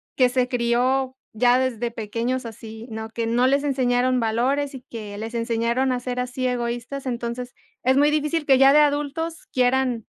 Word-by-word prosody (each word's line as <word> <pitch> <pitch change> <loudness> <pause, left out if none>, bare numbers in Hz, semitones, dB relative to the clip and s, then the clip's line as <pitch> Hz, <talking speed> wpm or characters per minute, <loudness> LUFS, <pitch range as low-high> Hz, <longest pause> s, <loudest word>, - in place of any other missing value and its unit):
que 255 -2 +4
se 250 0 +1
crió 250 +2 +1 0.2
ya 245 +3 +4
desde 240 -2 -1
pequeños 230 +3 -3
así, 225 0 -9
¿no?, 220 0 -5
que 230 +1 -3
no 240 +3 +2
les 280 +1 +2
enseñaron 255 -2 +1
valores 260 +5 0
y 260 - -8
que 210 -4 -8
les 225 +2 -6
enseñaron 235 +2 0
a 250 - -1
ser 250 0 -4
así, 250 +1 -3
egoístas. 245 +2 -3
Entonces, 245 0 -4 0.3
es 260 +2 +3
muy 295 +1 +4
difícil 300 +1 0
que 270 -2 +5
ya 270 0 +7
de 295 - +6
adultos 295 +3 0
quieran 250 -2 +1
250 Hz, 175 wpm, -23 LUFS, 235-265 Hz, 0.3 s, ya